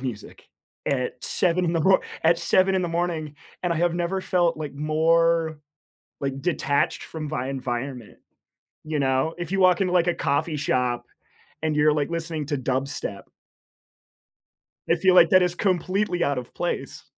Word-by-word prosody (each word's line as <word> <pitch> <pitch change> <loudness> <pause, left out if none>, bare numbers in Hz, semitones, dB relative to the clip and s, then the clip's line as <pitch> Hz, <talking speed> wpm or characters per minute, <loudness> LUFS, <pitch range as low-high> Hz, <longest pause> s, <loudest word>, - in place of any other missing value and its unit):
music 125 -5 -7 0.4
at 130 -3 -2
7 180 0 +1
in 170 - 0
the 165 - +1
mor 190 +4 +5 0.2
at 165 +1 +4
7 190 +1 +3
in 185 - 0
the 175 - -1
morning, 165 -3 -2 0.3
and 175 -1 +1
I - - -2
have 170 +1 +1
never 175 +2 -1
felt 175 -3 +1
like, 150 -3 -6
more 160 +1 +2 0.6
like, 135 -1 -3
detached 145 -5 0
from 155 -2 -6
my 130 -3 -3
environment. 125 -2 -5 0.7
You 155 -1 -2
know? 135 +4 +1
If 175 -1 -5
you 195 - 0
walk 185 0 +4
into, 185 -1 +1
a 175 0 +3
coffee 150 +3 0
shop 125 -3 0 0.6
and 155 -1 0
you're, 150 0 +4
like, 150 +1 -1
listening 160 -3 -3
to 145 -2 -1
dubstep 130 -5 -3 1.7
I 170 - +5
feel 185 +2 +3
like 170 -2 +7
that 185 -1 +6
is 175 -1 +1
completely 185 0 0
out 140 -2 +1
of 125 - -8
place. - - -4
160 Hz, 165 wpm, -24 LUFS, 140-175 Hz, 1.7 s, like